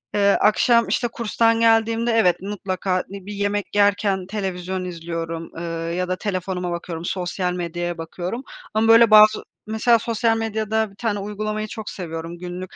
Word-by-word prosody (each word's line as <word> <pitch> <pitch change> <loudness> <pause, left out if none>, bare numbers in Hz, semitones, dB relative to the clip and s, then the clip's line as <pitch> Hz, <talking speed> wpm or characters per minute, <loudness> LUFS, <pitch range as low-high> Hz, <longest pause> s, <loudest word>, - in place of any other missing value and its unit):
Eee, 200 -1 +4
akşam, 235 +2 +4
işte, 240 - 0
kurstan 230 0 +1
geldiğimde 230 +1 +3
evet 185 -6 +3
mutlaka, 190 -2 -2
iii, 195 -1 -9
bir 205 - -6
yemek 205 0 -2
yerken 200 -2 +2
televizyon 190 -2 -3
izliyorum, 165 -1 -5
ııı, 165 0 -4
ya 180 +1 -1
da 185 - -1
telefonuma 185 -2 -3
bakıyorum. 170 -1 -5
Sosyal 180 0 -2
medyaya 175 0 -3
bakıyorum 180 +9 -5 0.3
ama 220 +1 +2
böyle 230 -1 +7
bazı 215 0 +7 0.2
mesela 225 +1 +3
sosyal 230 0 0
medyada 220 -1 -1
bir - - -19
tane 210 -1 -2
uygulamayı 215 +1 -3
çok 215 0 -7
seviyorum, 165 -1 -6
günlük 180 +1 -7
200 Hz, 155 wpm, -22 LUFS, 180-220 Hz, 0.3 s, böyle